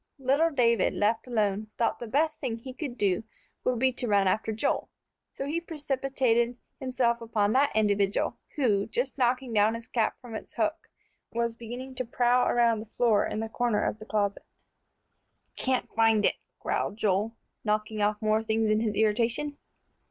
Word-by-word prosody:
Little 275 +5 +2
David, 235 -6 +2
left 220 +4 +1
alone, 215 -3 0
thought 235 - +1
the 240 - -6
best 305 +6 +1
thing 230 -2 -2
he 255 +3 -9
could 265 -3 -5
do 195 -1 +1 0.4
would 250 -1 +1
be 260 +2 +2
to 245 - -3
run 200 -2 +3
after 215 +4 +1
Joel. 220 - -1 0.4
So 275 - -5
he 315 +4 -1
precipitated 265 -6 0 0.2
himself 250 -3 0
upon 215 -2 +1
that 280 +2 +3
individual, 205 -2 +1 0.2
who, 210 -8 +2
just 255 +4 -2
knocking 250 0 +1
down 215 +1 +4
his 230 0 -8
cap 230 -3 0
from 245 -3 -11
its 220 - -8
hook, - - -1 0.4
was 235 0 -1
beginning 245 +3 -7
to 255 0 -3
prowl 245 +1 +2
around 235 -2 +3
the 215 0 -9
floor 225 -4 +3
in 215 - -3
the 225 - -2
corner 235 -2 0
of 215 - -2
the 215 - -9
closet. 205 -2 0 1.1
"Can't 260 -1 0
find 225 -2 +4
it," - - +2 0.2
growled 205 - -2
Joel, 210 +2 +1 0.3
knocking 215 0 -1
off 210 0 +1
more 215 0 +3
things 220 0 +1
in 215 - +3
his 215 -2 -1
irritation. 230 +7 +1
230 Hz, 175 wpm, -28 LUFS, 215-255 Hz, 1.1 s, down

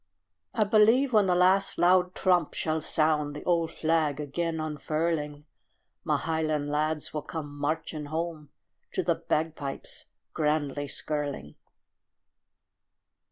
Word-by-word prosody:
I 220 - +4
believe 225 +5 +4
when 210 -3 +5
the 180 - +3
last 185 +2 +3
loud 180 +1 +4
trump 180 -4 +2
shall 160 0 -1
sound, 150 -2 +1
The 150 - -7
old 170 -2 +1
flag 155 -3 0
again 160 +3 -2
unfurling, 155 -1 -2 0.6
My - - +1
highland 155 -2 -1
lads 150 +1 -1
will 150 - -2
come 145 -3 -6
marching 155 +1 -2
home 160 -1 -4 0.4
To - - 0
the - - +2
bagpipes 150 -3 -3 0.3
grandly 150 -2 0
skirling. 145 - -4
155 Hz, 115 wpm, -28 LUFS, 150-170 Hz, 0.6 s, when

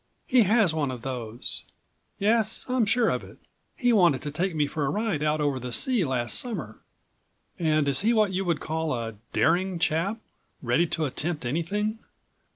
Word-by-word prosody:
"He 250 -1 +4
has 215 -7 +4
one 150 -3 0
of 125 -2 -6
those. 120 -3 -5 0.5
Yes, 220 +1 +1
I'm 250 -4 +1
sure 235 +1 +3
of - - -1
it. - - -13 0.4
He 245 -2 +2
wanted 175 -10 +4
to 145 - -4
take 175 +3 -1
me 150 -1 +2
for 145 +1 -3
a - - 0
ride 205 -4 -1
out 155 0 +1
over 145 -3 0
the 125 0 -6
sea 240 - +2
last 125 -4 +1
summer." 170 - -4 0.8
"And 155 -3 +2
is 140 -1 +2
he 220 +4 +2
what 215 -4 +2
you 190 +1 0
would 170 -5 0
call 160 -2 -2
a 115 -1 -4 0.2
daring 180 +2 +2
chap, 170 +6 0 0.5
ready 130 +8 +2
to 160 0 -1
attempt 150 +1 -2
anything?" 205 - -1
160 Hz, 180 wpm, -26 LUFS, 140-210 Hz, 0.8 s, He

